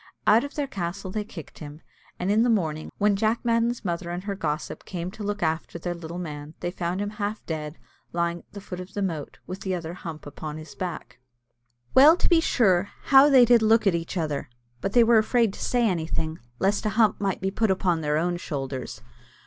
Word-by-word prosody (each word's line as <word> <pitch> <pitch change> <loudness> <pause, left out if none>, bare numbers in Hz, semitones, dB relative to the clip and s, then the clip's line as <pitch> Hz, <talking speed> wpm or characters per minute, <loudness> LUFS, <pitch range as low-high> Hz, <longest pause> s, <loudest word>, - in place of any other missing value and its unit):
Out 220 +3 +5
of 285 - -7
their 290 - 0
castle 190 -5 -5
they 215 - -2
then 210 - -9
kicked 165 -7 -10
him; 150 0 -9 0.4
and 180 +2 -1
in 215 +2 +4
the 240 - +3
morning, 160 -8 0
when 205 -1 +3
Jack 220 +4 0
Madden's 230 0 +1
mother 170 -1 -2
and 175 +1 -4
her 200 0 -3
gossip 160 -5 -3
came 180 -1 -5
to 215 - -11
look 205 -1 -2
after 160 +1 -1
their 175 +1 -3
little 170 0 -7
man, 150 -3 -7
they 175 - -3
found 180 +1 -3
him 205 0 -2
half 210 0 -4
dead, 155 -1 -5 0.3
lying 170 0 -1
at - - -24
the 200 - -8
foot 180 -2 -7
of 185 +2 -9
the 205 - -1
moat, 160 -6 -4
with 185 +1 -6
the 190 -1 -1
other 170 -1 -5
hump 165 -3 -8
upon 150 +1 -7
his 155 -2 -10
back. 135 -6 -6 0.7
Well 300 +6 +8
to - - +1
be 335 -2 +5
sure, 200 - +3
how 275 +1 +7
they 260 -3 +7
did 240 -1 +5
look 220 +1 +4
at 195 - +4
each 170 +3 -3
other! 150 -6 -2 0.3
but 195 - -2
they 240 - +7
were 230 -1 +6
afraid 225 -1 +2
to - - -7
say 245 -2 +2
anything, 160 -3 -2 0.2
lest 195 +7 +1
a 215 - -3
hump 220 -4 +3
might 195 -2 0
be 190 0 -1
put 220 +2 +1
upon 180 -3 +1
their 150 0 +1
own 175 +2 0
shoulders. 135 -6 -5
185 Hz, 225 wpm, -25 LUFS, 165-215 Hz, 0.7 s, Well